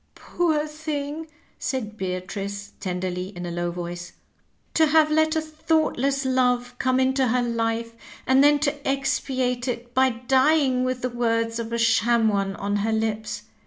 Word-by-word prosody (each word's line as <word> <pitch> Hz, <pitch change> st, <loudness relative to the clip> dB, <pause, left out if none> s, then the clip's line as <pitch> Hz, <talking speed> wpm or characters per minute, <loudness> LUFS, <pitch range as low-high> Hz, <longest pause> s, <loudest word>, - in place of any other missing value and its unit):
" -, -, -44 dB
Poor 315 Hz, -4 st, 0 dB
thing 305 Hz, 0 st, -4 dB
I -, -, -24 dB, 0.2 s
" -, -, -36 dB
said 220 Hz, -5 st, -3 dB
Beatrice 195 Hz, +1 st, -4 dB
tenderly, 180 Hz, 0 st, -3 dB
in 175 Hz, -, -5 dB
a 175 Hz, -, -4 dB
low 175 Hz, 0 st, -2 dB
voice; 175 Hz, 0 st, -6 dB, 0.3 s
" -, -, -42 dB
to 320 Hz, -1 st, +4 dB
have 310 Hz, 0 st, +4 dB
let 315 Hz, +1 st, +3 dB
a 315 Hz, -, +2 dB
thoughtless 310 Hz, -3 st, 0 dB
love 250 Hz, -1 st, +1 dB
come 260 Hz, 0 st, +2 dB
into 260 Hz, 0 st, +2 dB
her 245 Hz, +1 st, +2 dB
life, 230 Hz, -1 st, -1 dB, 0.3 s
and 265 Hz, +1 st, +5 dB
then 290 Hz, 0 st, +6 dB
to 285 Hz, -1 st, -1 dB
expiate 265 Hz, -2 st, 0 dB
it 240 Hz, -1 st, -4 dB
by 260 Hz, +1 st, +4 dB
dying 260 Hz, +2 st, +2 dB
with 255 Hz, -1 st, -2 dB
the 255 Hz, -, 0 dB
words 230 Hz, -1 st, 0 dB
of 230 Hz, 0 st, -4 dB
a 235 Hz, -, 0 dB
sham 230 Hz, 0 st, +3 dB
one 195 Hz, -1 st, -1 dB
on 205 Hz, +1 st, -1 dB
her 215 Hz, +2 st, 0 dB
lips. 220 Hz, 0 st, -2 dB
245 Hz, 175 wpm, -24 LUFS, 220-275 Hz, 0.3 s, then